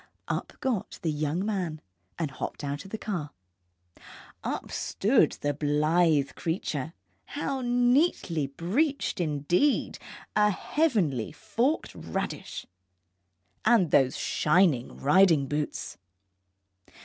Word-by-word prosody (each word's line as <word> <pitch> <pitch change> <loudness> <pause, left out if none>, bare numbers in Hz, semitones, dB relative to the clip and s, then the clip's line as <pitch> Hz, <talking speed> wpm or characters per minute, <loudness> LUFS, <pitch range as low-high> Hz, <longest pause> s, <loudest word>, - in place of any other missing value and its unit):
Up - - -3
got 245 -8 -2
the 160 - +1
young 155 +5 -1
man, 180 -7 -2 0.4
and 160 -4 -2
hopped 130 - -6
out 145 +5 -4
of - - -10
the 220 - -4
car. 180 -9 -4 1.1
Up - - -4
stood - - +2
the 145 0 0
blithe 150 +1 +2
creature 160 -3 -3 0.3
how 275 -2 -3
neatly 245 - +2
breeched, 215 - -1
indeed, 170 - +1 0.4
a 210 0 +5
heavenly 195 - 0
forked 230 - -1
radish - - -5 1.0
and 215 -8 +4
those 130 -2 +4
shining 150 -6 +2
riding 165 -1 +4
boots! 145 - -3
170 Hz, 100 wpm, -28 LUFS, 145-220 Hz, 1.1 s, a